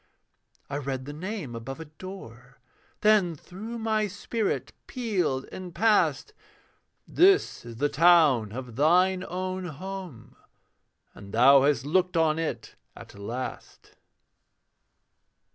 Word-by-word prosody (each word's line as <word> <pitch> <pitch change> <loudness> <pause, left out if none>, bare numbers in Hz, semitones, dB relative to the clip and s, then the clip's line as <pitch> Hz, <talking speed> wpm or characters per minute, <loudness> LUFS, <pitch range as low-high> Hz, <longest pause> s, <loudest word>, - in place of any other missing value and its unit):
I 140 - -4
read 135 -2 -4
the 145 - -7
name 180 - -5
above 135 +6 -7
a 160 - -7
door, 145 -7 -12 0.4
Then 210 -6 +4
through 210 +9 -8
my 220 -1 0
spirit 205 +2 -3
pealed 190 - -1
and 180 -2 -8
passed: 225 - +2 0.7
'This 390 +3 +3
is 115 - -8
the 145 +6 +1
town 150 -9 +4
of 125 -1 -8
thine 180 +5 +3
own 185 0 -4
home, 170 -7 -8 0.8
And 100 0 -12
thou 135 +5 +6
hast 140 -2 +1
looked 180 +3 +1
on 160 -1 +2
it 165 - -4 0.2
at - - -12
last.' 115 +6 -7
165 Hz, 115 wpm, -27 LUFS, 135-190 Hz, 0.8 s, thou